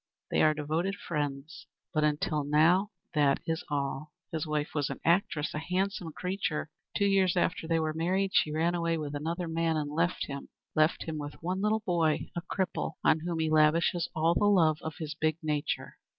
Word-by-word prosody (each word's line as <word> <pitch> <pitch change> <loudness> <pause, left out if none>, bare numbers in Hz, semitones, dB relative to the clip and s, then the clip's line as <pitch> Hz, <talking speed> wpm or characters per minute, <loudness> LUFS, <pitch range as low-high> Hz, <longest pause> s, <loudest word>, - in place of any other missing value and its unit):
They - - +3
are 155 0 +4
devoted 160 +6 -1
friends 150 -4 -4 0.3
but 155 - +2
until 150 0 +1
now 165 +7 +4 0.2
that 145 -3 +3
is 160 0 -2
all. 140 +1 -2 0.2
His 160 -1 -2
wife 150 0 -1
was 145 -3 0
an - - -5
actress 170 -3 +2
a 150 - -2
handsome 180 0 -2
creature. 180 -3 -3 0.3
Two 200 - +2
years 190 -2 +3
after 175 -2 0
they 165 0 +2
were 155 -1 -1
married 185 +4 0
she 155 - +3
ran 165 +3 +1
away 170 -1 0
with 150 -2 -4
another 165 +4 -3
man 165 0 0
and 145 -1 -2
left 170 +3 0
him. 140 -1 -7 0.3
Left 155 +1 +3
him 160 -2 -4
with 145 0 -6
one 185 +3 -1
little 215 +1 +2
boy, 165 -4 +1
a 175 - -2
cripple, 180 -1 -2
on 160 - +4
whom 170 +1 -3
he 160 -1 0
lavishes 160 +2 +3
all 160 +1 +3
the 205 - +2
love 165 -7 +4
of 160 -1 -5
his 155 -4 -4
big 155 0 0
nature." 150 -2 -2
160 Hz, 195 wpm, -30 LUFS, 150-175 Hz, 0.3 s, are